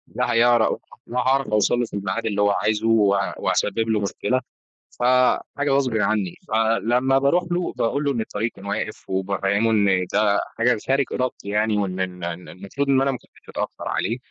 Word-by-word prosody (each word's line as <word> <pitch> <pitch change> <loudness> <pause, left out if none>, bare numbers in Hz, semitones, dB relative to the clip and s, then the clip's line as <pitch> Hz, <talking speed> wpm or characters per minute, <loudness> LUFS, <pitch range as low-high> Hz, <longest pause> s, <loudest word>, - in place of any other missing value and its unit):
لا - - 0
هيعر 120 -1 +4 0.3
لا 125 - -2
هاعرف 135 +2 +2
أوصل 105 +3 +2
له 120 - +1
في - - -16
الميعاد 100 +3 -3
اللي 105 -2 0
هو 100 0 +4
عايزه 110 +2 0
و 105 -3 +4 0.2
وأسبب 110 +3 0
له 110 -1 +2
مشكلة 105 +5 -1 0.6
ف - - -2 0.5
حاجة 140 0 0
غصبٍ 135 -4 +1
عني 105 -3 0
فلما 115 +4 +2
باروح 140 +6 +2
له 175 0 -1
باقول 140 +6 0
له 145 - +1
إن 120 -4 -1
الطريق 110 +1 -3
كان 95 - -14
واقف 100 +1 -4
وبافهمه 100 +3 0
إن 100 -4 +2
ده 105 -1 +3 0.2
حاجة 120 0 +3
خارج 135 +1 +2
إرادتي 125 -5 -3
يعني، 105 +1 +1
وإن 95 -2 -2
إن 90 -1 -4
إن 85 +1 -5
المفروض 100 +10 -4
إن 135 -1 +4
أنا 135 0 +2
مكنتش 130 - -11
أتأخر - - -5
عليه 115 +6 -1
110 Hz, 185 wpm, -22 LUFS, 100-125 Hz, 0.6 s, هيعر